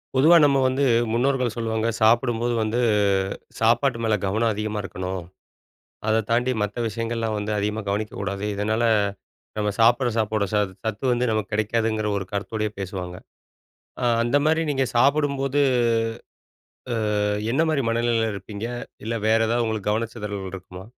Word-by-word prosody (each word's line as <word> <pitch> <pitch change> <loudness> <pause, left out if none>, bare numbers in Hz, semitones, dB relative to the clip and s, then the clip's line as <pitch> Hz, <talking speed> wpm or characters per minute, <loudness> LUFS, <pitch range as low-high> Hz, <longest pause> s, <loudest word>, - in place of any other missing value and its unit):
பொதுவா 155 +6 +6
நம்ம 140 -1 +4
வந்து 130 +2 +1 0.3
முன்னோர்கள் 125 0 +1
சொல்லுவாங்க 115 -1 -1
சாப்பிடும்போது 120 +1 +2
வந்து 110 +3 -1 0.8
சாப்பாட்டு 120 +2 +2
மேல 110 -1 +2
கவனம் 110 +4 +1
அதிகமா 105 0 -3
இருக்கணும். 95 -1 -5 0.9
அதைத் 110 -1 +2
தாண்டி 125 +2 +2
மத்த 105 0 -3
விஷியங்கள் 115 +2 -3
எல்லாம் 110 -1 -1
வந்து 105 +1 -2
அதிகமா 105 +2 -1
கவனிக்கக் 105 +1 -2
கூடாது. 100 0 -3
இதனால 110 +3 0 0.8
நம்ம 105 -1 0
சாப்டுற 120 +3 +4
சாப்பாடோட 110 -1 0
ச - - +3 0.3
சத்து 110 +2 -3
வந்து 120 0 +1
நமக்குக் 110 -1 -2
கிடைக்காதுங்கிற 110 0 0
ஒரு 95 - -6
கருத்தோடயே 105 +2 -2
பேசுவாங்க. 90 -2 -5 0.9
அ - - -2 0.2
அந்த 120 +4 +2
மாரி 160 +1 +3
நீங்கச் 135 -2 -1
சாப்பிடும்போது 140 +1 +2 1.6
அ - - +1 0.3
என்ன 155 +6 +3
மாரி 140 -4 0
மனநிலையில 115 -1 +1
இருப்பீங்க? 100 +2 -7 0.4
இல்ல, 115 - -2
வேற 110 +1 +4
ஏதாவது 120 +1 +1
உங்களுக்குக் 110 -2 -1
கவனச்சிதறல் 105 -3 -4
இருக்குமா? 95 -1 -9
110 Hz, 140 wpm, -24 LUFS, 105-120 Hz, 1.6 s, பொதுவா